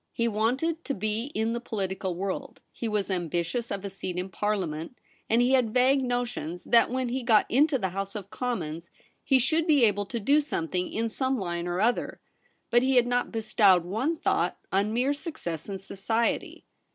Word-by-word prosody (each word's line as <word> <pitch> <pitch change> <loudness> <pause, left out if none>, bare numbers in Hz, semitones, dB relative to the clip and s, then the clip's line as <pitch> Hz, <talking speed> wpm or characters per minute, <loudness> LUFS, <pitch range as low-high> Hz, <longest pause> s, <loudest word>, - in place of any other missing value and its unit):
He 235 - +1
wanted 260 +10 0
to 280 - -2
be 215 +3 -1
in 220 +1 0
the 235 - -2
political 190 -5 -3
world; 195 +9 -4
he 235 - -4
was 210 -2 -1
ambitious 175 +6 -2
of 200 0 -4
a - - -3
seat 185 -2 -5
in 180 +1 -3
Parliament; 185 -1 -2 0.3
and 230 +2 +4
he 250 - +2
had 250 -4 +2
vague 265 +2 +4
notions 245 -9 -3
that 235 - +4
when 255 0 -1
he 260 +2 -2
got 230 -3 +4
into 285 +3 +4
the 190 -6 -1
House 195 +2 -4
of 200 -2 -7
Commons 170 -10 -3 0.3
he 270 - +4
should 315 +6 +1
be 290 -6 +5
able 205 -1 +1
to 235 - -3
do 285 +8 +4
something 180 - -2
in 230 +1 -1
some 260 +4 -1
line 175 -4 -3
or 175 +1 -1
other; 235 +4 0 0.5
but 240 - +5
he 265 +1 +2
had 245 -1 +5
not 245 0 0
bestowed 205 -5 +3
one 245 - -1
thought - - 0
on 200 +2 +1
mere 250 +5 +1
success 250 - -6
in 195 - -3
society. 210 +4 -2
220 Hz, 190 wpm, -27 LUFS, 190-250 Hz, 0.5 s, be